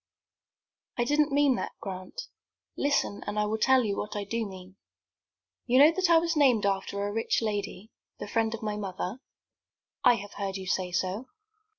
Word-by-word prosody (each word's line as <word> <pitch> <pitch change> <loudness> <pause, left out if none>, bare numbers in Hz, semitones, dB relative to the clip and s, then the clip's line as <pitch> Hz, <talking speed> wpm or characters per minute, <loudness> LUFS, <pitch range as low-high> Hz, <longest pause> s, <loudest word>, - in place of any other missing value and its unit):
"I 240 - +2
didn't 295 +3 +2
mean 280 -2 +3
that, - - -4
Grant. 190 - -6 0.5
Listen, 285 -7 0
and 205 +1 -3
I 210 - +2
will 220 +1 -2
tell 260 +2 +4
you 205 -3 -1
what 210 - -4
I 205 - -2
do 225 +2 -2
mean. 190 0 -12 0.9
You 250 +1 +3
know 290 +4 +8
that 370 +1 0
I 335 - +7
was 335 0 +1
named 255 -8 +4
after 200 0 -1
a - - -3
rich 225 +1 +1
lady, 210 -1 -4 0.3
the - - -6
friend 225 +1 0
of 230 - -10
my 210 -1 -2
mother?" 195 +2 -4 0.8
"I 245 - +6
have 205 -1 -8
heard 195 -1 -3
you 190 - -7
say 185 0 -1
so." 190 +7 -2
215 Hz, 185 wpm, -28 LUFS, 200-260 Hz, 0.9 s, know